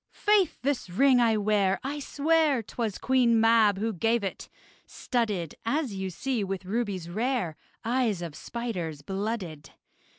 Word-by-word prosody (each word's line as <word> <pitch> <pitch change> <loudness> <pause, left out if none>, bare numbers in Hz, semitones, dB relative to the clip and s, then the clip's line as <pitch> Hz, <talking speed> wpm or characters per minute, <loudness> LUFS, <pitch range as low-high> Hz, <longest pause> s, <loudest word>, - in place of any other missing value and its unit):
Faith! 415 -3 +3
this 275 -8 -1
ring 255 +7 +4
I 225 -2 +3
wear, 200 -2 +2
I 285 +3 -3
swear, 295 -2 +2
'Twas 220 -2 -3
Queen 245 -3 +3
Mab 225 -3 +5
who 220 +2 -1
gave 225 +5 +1
it: 195 - -5 0.4
studded, 210 - -2
As 255 0 -1
you 190 -1 -3
see, 240 +5 -2
with 195 -1 -4
rubies 200 -4 -2
rare 215 - -1 0.3
Eyes 230 -6 0
of 165 -3 -6
spiders 175 -7 -5
blooded. 190 -5 -4
225 Hz, 140 wpm, -27 LUFS, 190-250 Hz, 0.4 s, Mab